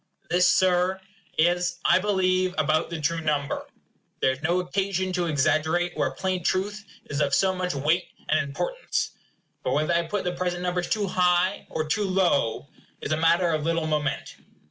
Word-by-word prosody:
This, 180 +1 +4
Sir, 185 0 +3 0.4
is, 175 +1 +2
I - - +5
believe, 185 -2 +1
about 155 +1 +1
the 170 -1 -4
true 165 +2 0
number. 150 -2 -1 0.5
There 130 - +3
is 130 +2 -7
no 170 +3 +1
occasion 185 0 -1
to 175 -1 0
exaggerate 160 +4 +1
where - - +1
plain 185 -2 -2
truth 205 +4 -1 0.2
is 145 +1 -3
of 140 -1 +2
so 190 -1 +3
much 180 -3 -2
weight 155 +6 +1 0.2
and 155 - +3
importance. 330 - -2 0.5
But - - -1
whether 155 +3 +1
I 170 0 +1
put 205 +3 -2
the 180 - -1
present 180 0 -2
numbers 180 0 -1
too 210 -2 +1
high 180 0 +1
or 155 - -2
too 205 +7 0
low 180 -11 +1 0.3
is - - -5
a 155 - +2
matter 170 +2 +3
of 155 -2 -1
little 165 0 0
moment. 150 -3 -2
175 Hz, 175 wpm, -25 LUFS, 155-185 Hz, 0.5 s, I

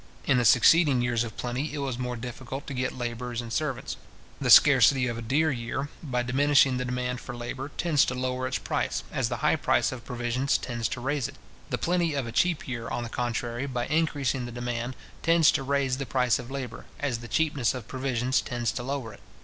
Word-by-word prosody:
In 130 - +3
the 120 - +1
succeeding 130 +3 +5
years 120 -1 +1
of 115 -2 -8
plenty, 130 +6 -3
it - - -4
was 135 -4 -3
more 125 -1 -2
difficult 125 +3 -6
to 140 - -6
get 125 0 -2
labourers 120 0 -4
and 115 -1 -5
servants. 150 -5 -2 0.4
The - - -1
scarcity 135 -3 +7
of 120 -2 -2
a - - -5
dear 145 +7 +2
year, 120 +3 -3
by 125 -5 -1
diminishing 135 +1 +4
the 125 - -2
demand 125 0 -2
for 125 - -7
labour, 130 +3 -5
tends 160 -5 +3
to 125 - -2
lower 130 0 -2
its 130 - -1
price, - - -2
as - - 0
the - - -2
high - - +4
price - - +2
of 125 -3 -7
provisions 125 +2 0
tends 120 -2 -3
to 120 - -5
raise 135 -1 -1
it. - - -12 0.3
The - - -1
plenty 170 -3 0
of 135 -3 -1
a 115 - -5
cheap 170 +7 +1
year, 115 -3 -4
on 120 - -2
the 115 - -5
contrary, 120 +2 -2
by 120 -2 -2
increasing 140 -5 0
the - - -7
demand, 120 +1 -3 0.3
tends 165 -1 +5
to 145 - -1
raise 135 -1 0
the 135 -1 -4
price 125 -3 +2
of 125 -1 -8
labour, 130 -4 -6
as 135 -5 -1
the 120 - -9
cheapness 140 -1 +1
of 125 -4 -7
provisions 130 -1 0
tends 120 -3 -2
to - - -4
lower 130 -3 -4
it. - - -14
125 Hz, 220 wpm, -27 LUFS, 120-140 Hz, 0.4 s, scarcity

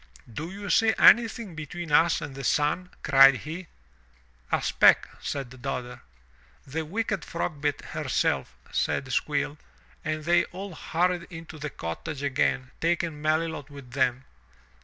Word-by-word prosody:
"Do 160 +8 -5
you 200 +2 -5
see 225 -1 +4
anything 230 -4 +5
between 160 +1 -6
us 165 +3 +4
and 145 -4 -6
the 135 0 -7
sun?" 150 +7 +1
cried 135 -1 +7
he. 165 +3 -6 0.8
''A - - +2
speck/' - - +5
said 130 -3 -5
Dodder. 125 0 -4 0.6
'The 160 +4 -3
wicked 210 +1 -2
Frogbit 150 -4 -3
herself," - - -1 0.2
said 130 -2 -1
Squill, 145 0 -1 0.4
and 155 0 -2
they 170 +2 +3
all 190 +1 -8
hurried 175 +2 -1
into 165 -2 -9
the 150 +1 -4
cottage 140 - -6
again 135 -1 0
taking 165 -2 0
Melilot 155 -1 -1
with 140 -4 -12
them. 130 -1 0
155 Hz, 135 wpm, -27 LUFS, 140-175 Hz, 0.8 s, cried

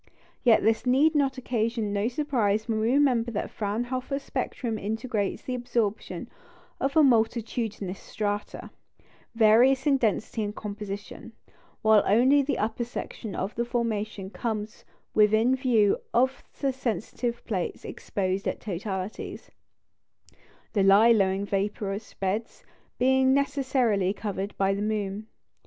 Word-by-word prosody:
Yet 235 -4 +5
this 225 +3 +1
need 290 +5 +4
occasion 240 -6 0
no 205 +2 +1
surprise 235 -6 0
when 220 -2 0
we 225 +2 +1
remember 255 -4 +3
that 215 -3 -2
the - - -7
Fraunhofer 245 +6 -2
spectrum 250 -4 -3
integrates 220 0 -2
the 255 - -4
absorption 240 -4 -2 0.5
of 275 +1 -1
multitudinous 225 - +1
strata, 205 -1 -4 0.6
various 240 +4 +5
in 280 -2 +4
density 225 -1 -1
and 205 0 -4
composition, 205 -1 -7 0.5
while 215 -1 +6
only 255 +7 +5
the 280 +1 -1
upper 220 +3 -1
section 230 -2 -6
of 195 +3 -3
the 235 - -1
formation 215 -5 -2
comes 215 -3 -4 0.3
within 220 +4 +4
view 235 -6 +2 0.2
of 260 +3 +2 0.2
the 275 -2 0
sensitive 240 -1 -3
plates 190 -6 -3
exposed 190 0 -3
at - - -2
totalities, 190 0 -5 1.2
the 205 - +2
low 200 +4 +6
lying 195 -2 +2
vaporous 200 +1 -3
beds 200 +4 -3 0.3
being 265 +1 +4
necessarily 260 -9 +1
covered 200 -1 -4
by 195 0 +2
the 200 - -3
moon. 210 0 -2
220 Hz, 125 wpm, -27 LUFS, 205-250 Hz, 1.2 s, while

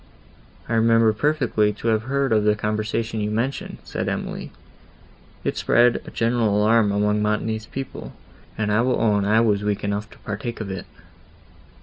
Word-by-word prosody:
"I 115 - -2
remember 115 -1 +4
perfectly 120 -5 +1
to 115 +3 -3
have 110 -1 +2
heard 135 0 0
of 110 -1 +3
the 105 0 +3
conversation 110 +1 -2
you 105 - -1
mention," 115 +6 -2
said - - -3
Emily; - - -4 0.9
"it - - -2
spread 120 0 +3
a - - -5
general 115 -3 +1
alarm 105 0 +4
among 105 +1 +1
Montoni's 110 +1 -1
people, 135 -1 -7 0.5
and 105 -1 0
I 105 +2 +3
will 125 +1 +1
own 105 -3 +2
I 110 +2 +4
was 105 -3 +2
weak 105 -1 -1
enough 100 +1 -2
to - - -17
partake 110 +3 -5
of 105 -3 -4
it." 95 - -6
110 Hz, 170 wpm, -23 LUFS, 105-115 Hz, 0.9 s, remember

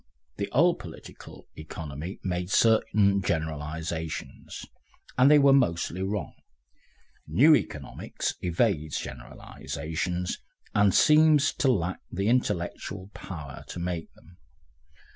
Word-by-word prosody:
The 100 - -3
old 170 +7 +3
"Political 80 - -12
Economy" 80 +2 -7
made 90 -1 -2
certain 105 -3 +3
generalisations, 80 -1 -4 0.5
and 130 +2 +5
they 150 - +7
were 140 -1 +6
mostly 90 -7 +1
wrong; 100 +1 -3 0.9
new 135 - +6
Economics 70 - -4
evades 85 -4 0
generalisations, 80 +7 -5 0.3
and 100 -1 +4
seems 155 - +5
to 135 - +2
lack 90 -5 -1
the 100 +3 -1
intellectual 100 -4 -2
power 75 -7 -8
to - - -8
make 85 -2 -4
them. 85 +3 -20
90 Hz, 105 wpm, -27 LUFS, 80-110 Hz, 0.9 s, they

